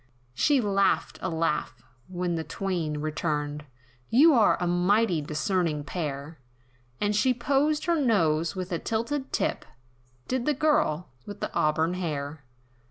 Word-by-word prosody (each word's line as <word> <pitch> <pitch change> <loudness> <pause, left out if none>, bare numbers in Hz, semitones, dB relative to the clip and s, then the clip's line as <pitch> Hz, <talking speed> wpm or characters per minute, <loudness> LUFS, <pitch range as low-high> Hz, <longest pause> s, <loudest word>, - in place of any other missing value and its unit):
She 285 - +3
laughed 195 -6 +1
a 185 - -2
laugh, 160 -2 -2 0.2
when 180 -1 -2
the 165 -1 -2
twain 170 -3 -3
returned, 150 -1 -2 0.4
"You're 260 -3 +5
a 175 - -1
mighty 180 +1 +2
discerning 150 +1 -1
pair!" 145 -1 -5 0.6
And 205 0 0
she 250 +4 +3
posed 285 +5 +1
her 340 0 +2
nose, 165 - +2
with 185 0 -5
a 170 - -1
tilted 260 +5 -2
tip, - - -1 0.6
Did 255 0 -2
the 300 - +2
girl, 255 - +1 0.2
with 205 0 -8
the - - -4
auburn 160 +3 +1
hair. 150 -4 -4
180 Hz, 135 wpm, -27 LUFS, 155-225 Hz, 0.6 s, You're